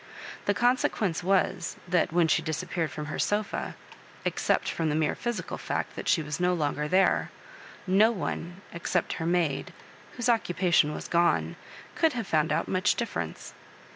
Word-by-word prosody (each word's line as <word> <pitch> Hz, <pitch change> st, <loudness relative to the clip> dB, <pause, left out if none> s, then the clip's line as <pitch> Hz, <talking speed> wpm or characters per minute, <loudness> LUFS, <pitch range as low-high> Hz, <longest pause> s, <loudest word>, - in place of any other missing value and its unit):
The 200 Hz, -, +3 dB
consequence 240 Hz, -7 st, +1 dB
was, 185 Hz, -2 st, +1 dB
that 175 Hz, -2 st, +2 dB
when 170 Hz, 0 st, +3 dB
she -, -, +3 dB
disappeared 165 Hz, 0 st, -2 dB
from 150 Hz, +2 st, -6 dB
her 155 Hz, -, -5 dB
sofa 205 Hz, 0 st, -1 dB, 0.5 s
^except -, -, +1 dB
from 165 Hz, -2 st, -1 dB
the 150 Hz, -, 0 dB
mere 155 Hz, -1 st, +1 dB
physical 240 Hz, -2 st, -4 dB
fact -, -, -3 dB
that -, -, -6 dB
she 160 Hz, -, +3 dB
was 150 Hz, -1 st, -4 dB
no 180 Hz, 0 st, +2 dB
longer 150 Hz, -2 st, -1 dB
there 190 Hz, +4 st, +3 dB, 0.3 s
— -, -, -17 dB, 0.2 s
^no 205 Hz, +5 st, +5 dB
one, 175 Hz, -1 st, -4 dB
except 170 Hz, +1 st, -1 dB
her 160 Hz, -, -1 dB
maid, 170 Hz, -5 st, 0 dB, 0.4 s
whose 245 Hz, -1 st, -2 dB
occupation 180 Hz, -8 st, +2 dB
was -, -, -6 dB
gone, 170 Hz, 0 st, +2 dB, 0.4 s
could 320 Hz, -3 st, +2 dB
have 230 Hz, -4 st, -3 dB
found 155 Hz, -3 st, +1 dB
out -, -, 0 dB
much 185 Hz, +2 st, +2 dB
difference. 235 Hz, -, -4 dB
175 Hz, 165 wpm, -28 LUFS, 160-200 Hz, 0.5 s, ^no